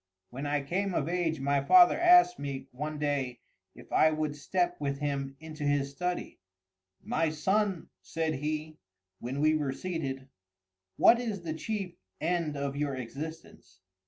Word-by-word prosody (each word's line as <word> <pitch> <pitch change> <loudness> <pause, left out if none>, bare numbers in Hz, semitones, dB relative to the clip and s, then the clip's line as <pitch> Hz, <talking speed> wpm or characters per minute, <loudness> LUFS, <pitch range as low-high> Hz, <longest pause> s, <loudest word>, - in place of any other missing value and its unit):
When 135 +4 -5
I 145 -1 0
came 185 +5 -1
of 145 - 0
age 170 -3 0
my 140 0 +1
father 355 - +7
asked 355 +1 +6
me, 140 -2 -5
one 150 +4 -4
day, 140 -4 -2 0.3
if - - -15
I 155 - +5
would 155 -1 -2
step 175 +4 -1
with 140 -1 -1
him 140 -2 -3
into 155 -1 -8
his 145 -1 +1
study. 180 +5 -4 0.6
"My 165 0 0
son," 190 +4 0
said 160 -1 -2
he, 155 +2 -4 0.4
when 130 +4 -4
we 155 +1 +4
were 150 -3 0
seated, 135 -4 -4 0.7
"what 235 - +6
is 215 -7 -4
the 160 -2 -3
chief 185 +1 -4 0.2
end 160 -2 -1
of 140 0 -3
your 145 -1 -1
existence?" 130 - -8
155 Hz, 155 wpm, -30 LUFS, 140-175 Hz, 0.7 s, father